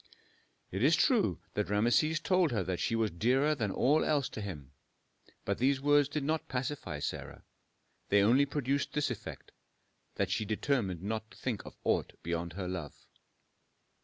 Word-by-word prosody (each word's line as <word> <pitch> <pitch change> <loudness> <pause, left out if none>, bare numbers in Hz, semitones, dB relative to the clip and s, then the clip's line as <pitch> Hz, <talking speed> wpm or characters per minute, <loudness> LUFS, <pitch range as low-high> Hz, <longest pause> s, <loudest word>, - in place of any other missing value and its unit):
It 95 - -3
is 155 +4 +6
true 230 - +2
that 105 -1 -1
Rameses 120 +10 +3
told 185 -2 +2
her 105 -5 0
that 90 0 -3
she 115 - 0
was 110 -2 +1
dearer 130 - +2
than 115 -8 -1
all 140 +10 +3
else 145 -3 +1
to 110 - -6
him, 75 -10 -7 0.7
but - - -1
these 135 +2 +3
words 145 0 +4
did 150 -1 -2
not 155 +2 -1
pacify 130 +1 -3
Sarah; - - -5 0.7
they 100 0 +5
only 130 +7 +4
produced 140 0 -1
this 145 -3 0
effect, 115 - -8 0.6
that 100 -2 -1
she 110 +2 0
determined 105 - -1
not 110 +1 -3
to - - -17
think 120 -6 -3
of - - -11
aught - - 0
beyond 85 0 -3
her 95 0 -4
love. 90 -6 -5
120 Hz, 165 wpm, -32 LUFS, 100-145 Hz, 0.7 s, is